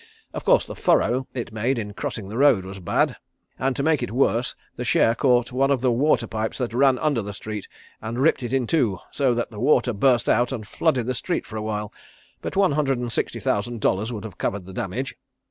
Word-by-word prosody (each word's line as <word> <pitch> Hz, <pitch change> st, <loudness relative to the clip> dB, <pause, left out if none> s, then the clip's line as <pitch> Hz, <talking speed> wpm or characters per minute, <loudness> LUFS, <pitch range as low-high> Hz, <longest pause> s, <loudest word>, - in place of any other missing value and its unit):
Of -, -, -5 dB
course -, -, +4 dB
the -, -, -7 dB
furrow 130 Hz, -7 st, +2 dB
it 120 Hz, -2 st, -4 dB
made 120 Hz, +4 st, 0 dB
in 105 Hz, -2 st, -4 dB
crossing 100 Hz, -1 st, -5 dB
the 105 Hz, +3 st, -6 dB
road 135 Hz, -10 st, +5 dB
was 95 Hz, +1 st, -8 dB
bad, 90 Hz, -, +1 dB, 0.4 s
and 135 Hz, 0 st, 0 dB
to 140 Hz, -, -1 dB
make 155 Hz, -2 st, +2 dB
it 120 Hz, -, -2 dB
worse 120 Hz, 0 st, +1 dB, 0.2 s
the -, -, -4 dB
share 115 Hz, -, +3 dB
caught 120 Hz, 0 st, +2 dB
one 135 Hz, +2 st, +2 dB
of 135 Hz, -3 st, +2 dB
the 130 Hz, -1 st, +3 dB
water 140 Hz, +6 st, +2 dB
pipes 110 Hz, 0 st, -3 dB
that 120 Hz, -3 st, -3 dB
ran 130 Hz, +1 st, +4 dB
under 145 Hz, -4 st, +1 dB
the 100 Hz, -1 st, -6 dB
street, 105 Hz, -1 st, -6 dB, 0.3 s
and 115 Hz, +2 st, -4 dB
ripped 140 Hz, +2 st, +3 dB
it 120 Hz, -1 st, -4 dB
in 130 Hz, -2 st, +1 dB
two 115 Hz, -, +1 dB
so 130 Hz, -4 st, +1 dB
that 120 Hz, 0 st, -2 dB
the 105 Hz, -, -8 dB
water 125 Hz, -1 st, +3 dB
burst 120 Hz, +3 st, +3 dB
out 120 Hz, +3 st, +3 dB
and 110 Hz, -6 st, -5 dB
flooded 130 Hz, 0 st, +1 dB
the 130 Hz, -, -1 dB
street 175 Hz, +8 st, -2 dB
for 110 Hz, -, -10 dB
a 110 Hz, -, -2 dB
while, 105 Hz, -1 st, -3 dB, 0.5 s
but -, -, -5 dB
one 195 Hz, -3 st, +4 dB
hundred 140 Hz, -3 st, +1 dB
and 120 Hz, -1 st, -3 dB
sixty -, -, -2 dB
thousand 115 Hz, +3 st, -1 dB
dollars 105 Hz, +3 st, 0 dB
would 110 Hz, -4 st, -5 dB
have 110 Hz, -3 st, -9 dB
covered 100 Hz, -2 st, -2 dB
the 95 Hz, -, -10 dB
damage." 120 Hz, +10 st, -3 dB
120 Hz, 230 wpm, -24 LUFS, 110-135 Hz, 0.5 s, road